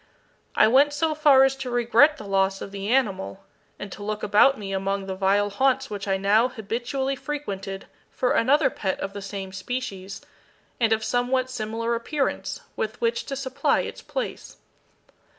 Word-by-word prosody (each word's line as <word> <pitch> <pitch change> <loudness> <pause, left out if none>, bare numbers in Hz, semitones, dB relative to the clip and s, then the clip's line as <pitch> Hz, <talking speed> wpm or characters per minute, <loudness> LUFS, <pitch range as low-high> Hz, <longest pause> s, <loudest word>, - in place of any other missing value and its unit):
I 215 - +6
went 280 +5 +4
so 315 +2 +1
far 290 -3 +6
as 270 0 +3
to 270 -2 -5
regret 245 +5 +4
the 215 - -9
loss 195 0 +1
of 195 - -7
the 200 0 -5
animal, 195 -6 0 0.3
and 205 - -8
to 205 - -9
look 210 +1 -4
about 270 +7 +5
me 195 -2 -5
among 195 0 -1
the 190 - -4
vile 200 +2 +1
haunts 265 +4 +1
which 205 -1 -5
I 195 -1 +1
now 205 +5 +3
habitually 250 +4 -3
frequented 200 -10 -5 0.2
for 250 - -1
another 270 +3 +3
pet 190 -2 -3
of 195 - -4
the 200 - -6
same 195 -1 -6
species, 195 -2 -5 0.6
and 230 -2 +2
of 220 0 +2
somewhat 255 +2 0
similar 230 0 -2
appearance, 270 +5 -2
with 220 +2 -3
which 235 0 0
to 275 - -4
supply 265 0 0
its - - -7
place. - - -5
225 Hz, 170 wpm, -25 LUFS, 195-265 Hz, 0.6 s, I